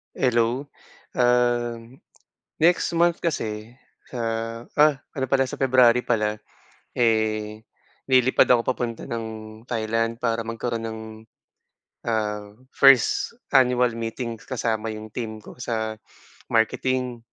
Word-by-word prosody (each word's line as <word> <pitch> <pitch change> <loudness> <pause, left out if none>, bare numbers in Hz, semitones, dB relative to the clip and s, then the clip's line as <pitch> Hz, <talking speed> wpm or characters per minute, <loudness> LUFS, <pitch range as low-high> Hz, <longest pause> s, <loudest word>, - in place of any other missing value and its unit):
Hello, 120 +1 +1 0.6
um, 120 0 +1 0.6
next 170 +1 +3
month 170 0 +3
kasi 110 -8 -3 0.4
ah, 115 -1 -3
ah! 150 -2 +4 0.2
Ano 130 - 0
pala 135 -1 +1
sa - - -6
February 125 -2 +4
pala, 105 -3 0 0.6
eh, 110 -2 +1 0.5
lilipad 130 -1 +4
ako 120 -2 +4
papunta 120 -2 -3
ng 115 -1 -4 0.4
Thailand 115 0 -1
para 115 -1 0
magkaroon 115 0 -3
ng, 110 0 -6 1.1
ah, 105 -2 -1 0.2
first 135 - +4 0.2
annual 125 -2 +4
meeting 115 0 -5
kasama 115 -3 -2
yung 110 -1 -6
team 110 -2 -6
ko - - -13
sa 110 -2 -3 0.5
marketing. 125 +2 0
115 Hz, 105 wpm, -24 LUFS, 110-125 Hz, 1.1 s, ah